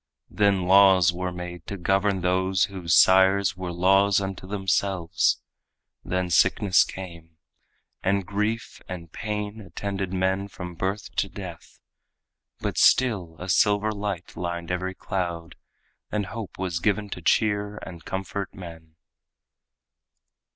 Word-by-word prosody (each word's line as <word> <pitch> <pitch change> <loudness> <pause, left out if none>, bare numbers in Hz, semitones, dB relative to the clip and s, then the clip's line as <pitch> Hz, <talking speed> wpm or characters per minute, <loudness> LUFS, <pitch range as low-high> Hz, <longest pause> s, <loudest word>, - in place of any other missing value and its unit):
Then 100 -3 +2
laws 95 -1 +6
were 90 +1 -3
made 90 -1 -8
to 100 - -5
govern 95 +1 +1
those 95 +1 +1
whose 90 -5 0
sires 95 +1 +5
Were 90 -1 -5
laws 95 +3 +4
unto 95 -1 -5
themselves. 95 -3 0 0.6
Then 90 -1 -2
sickness 95 +4 +4
came, 85 -4 -9 0.6
And 100 0 +1
grief 105 +4 -2
and 85 -3 -7
pain 105 +1 -4
attended 95 +1 -4
men 95 +1 0
from 90 -2 -8
birth 95 +4 -3
to 100 - +1
death. 90 -5 -10 0.8
But - - -2
still 100 -10 +3
a 90 - -7
silver 105 +3 +3
light 100 -4 -5
lined 85 0 -4
every 95 +1 -2
cloud, 85 -4 -4 0.6
And 105 -1 -1
hope 110 0 -7
was 90 -2 -2
given 105 +2 0
to 90 - -5
cheer 105 +2 +1
and 85 -3 -9
comfort 95 +1 -5
men. 80 -3 -11
95 Hz, 125 wpm, -25 LUFS, 90-100 Hz, 0.8 s, laws